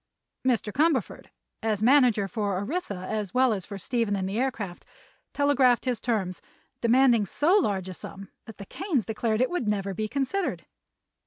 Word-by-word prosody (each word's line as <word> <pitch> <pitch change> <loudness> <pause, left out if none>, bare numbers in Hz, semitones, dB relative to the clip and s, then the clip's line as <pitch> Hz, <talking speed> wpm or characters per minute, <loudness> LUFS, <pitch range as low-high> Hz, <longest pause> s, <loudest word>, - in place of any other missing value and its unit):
Mr. 230 -5 0
Cumberford, 295 -5 0 0.3
as 215 -2 -1
manager 245 -5 +4
for 205 -3 -2
Orissa 205 - -3
as 210 -2 -3
well 255 -2 +4
as 190 -4 -5
for 200 - -6
Stephen 225 +1 -1
and 190 -1 -2
the 200 +4 -2
aircraft, 225 -9 -3 0.5
telegraphed 270 -4 +3
his 250 -3 -1
terms, 195 -7 -1 0.4
demanding 240 -1 +4
so 315 - +2
large 195 - -1
a 185 - -6
sum 195 +2 -9 0.2
that 225 - -11
the 200 - -8
Kanes 315 - -2
declared 220 +1 -1
it 255 - +2
would 355 -11 -2
never 200 -2 -1
be 215 +3 -2
considered. 280 - -2
225 Hz, 165 wpm, -26 LUFS, 200-260 Hz, 0.5 s, manager